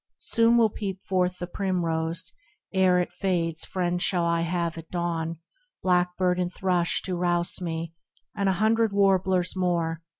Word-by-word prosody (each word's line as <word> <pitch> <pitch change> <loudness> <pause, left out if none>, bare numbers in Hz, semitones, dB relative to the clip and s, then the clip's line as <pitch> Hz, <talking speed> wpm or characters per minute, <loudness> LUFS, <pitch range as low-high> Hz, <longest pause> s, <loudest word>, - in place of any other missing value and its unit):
Soon 230 0 +3
will 225 -3 +4
peep 195 -3 -5
forth 180 -1 0
the 175 - -4
primrose, 170 -3 -1 0.4
ere 185 -1 +4
it 180 - -2
fades 165 -4 -1
Friends 180 -1 -1
shall 180 -2 +1
I 170 0 +1
have 170 0 -1
at 165 -1 -10
dawn, 170 -2 -2 0.5
blackbird 180 0 +2
and 180 -1 -1
thrush 180 -3 0
To 185 - -2
rouse 175 0 0
me, 165 -1 -4 0.4
and 200 -1 +1
a - - +3
hundred 220 +2 +2
warblers 190 -2 +2
more 170 -3 0
180 Hz, 155 wpm, -26 LUFS, 170-190 Hz, 0.5 s, will